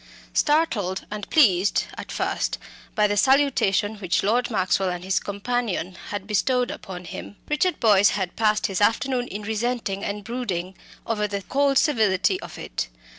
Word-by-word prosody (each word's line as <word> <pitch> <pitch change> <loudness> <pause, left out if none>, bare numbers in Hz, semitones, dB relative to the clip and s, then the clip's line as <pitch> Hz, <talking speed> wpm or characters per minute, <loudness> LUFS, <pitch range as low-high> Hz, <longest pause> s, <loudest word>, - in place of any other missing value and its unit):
Startled 230 - +1
and 210 -1 -6
pleased 205 - +4
at - - -8
first - - -1 0.4
by 210 - +4
the 205 0 +1
salutation 220 -5 +3
which 185 -3 0
Lord 235 +5 +1
Maxwell 190 -3 +1
and 180 0 -4
his 190 0 +1
companion 200 -3 -2
had 205 -2 -4
bestowed 245 +4 +1
upon 180 -1 -8
him, 190 +3 -8
Richard 300 +5 +1
Boyce 205 -4 +5
had 185 -3 -3
passed 215 -1 +2
his 195 0 -1
afternoon 245 +3 +1
in 210 +2 -6
resenting 220 -2 -2
and 205 0 -3
brooding 190 -6 -4 0.3
over 210 -2 0
the 200 -1 -4
cold 275 +4 +2
civility 200 - +2
of - - -9
it. - - -4
210 Hz, 155 wpm, -24 LUFS, 190-245 Hz, 0.4 s, Boyce